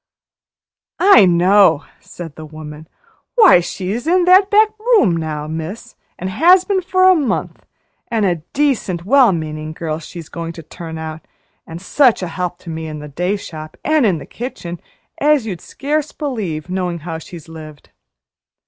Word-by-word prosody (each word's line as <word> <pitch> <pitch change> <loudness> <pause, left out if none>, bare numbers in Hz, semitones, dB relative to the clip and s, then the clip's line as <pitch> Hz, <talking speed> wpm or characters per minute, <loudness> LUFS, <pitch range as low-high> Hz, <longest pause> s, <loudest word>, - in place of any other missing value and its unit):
"I 355 - +7
know!" 180 -2 +4
said 165 -4 -10
the 155 - -9
woman. 155 0 -10 0.5
"Why, 425 - +7
she's 195 - -4
in 355 +1 +3
that 375 +2 +6
there 430 0 +6
back 430 - -18
room 430 - +3
now, 155 -2 -4
miss, 165 +10 -7 0.2
an' 185 - -5
has 355 - +5
been 395 -2 0
for 370 +1 +1
a 375 - +7
month, 295 -8 -2 0.4
an' 225 -2 -1
a 180 -3 +1
decent, 190 - -1
well 260 0 +5
meaning 155 -2 -4
girl 160 -1 -4
she's 165 0 -10
going 165 0 -6
to 165 - -10
turn 160 +1 -8
out, 160 0 -7 0.4
an' 165 - -7
such 235 +4 +2
a - - -2
help 180 0 -4
to 170 - -8
me 160 0 -5
in 155 -1 -6
the 150 0 -9
day 180 +7 -1
shop, 155 -6 -9
an' 310 -2 +3
in 190 -6 +2
the - - -9
kitchen, 175 -8 -7 0.4
as 295 -4 +3
you'd 185 -6 -5
scarce 300 +2 -3
believe, 205 - -4
knowing 180 -2 -2
how 165 -2 -4
she's 165 0 -11
lived." 155 -2 -12
180 Hz, 170 wpm, -18 LUFS, -, 0.5 s, I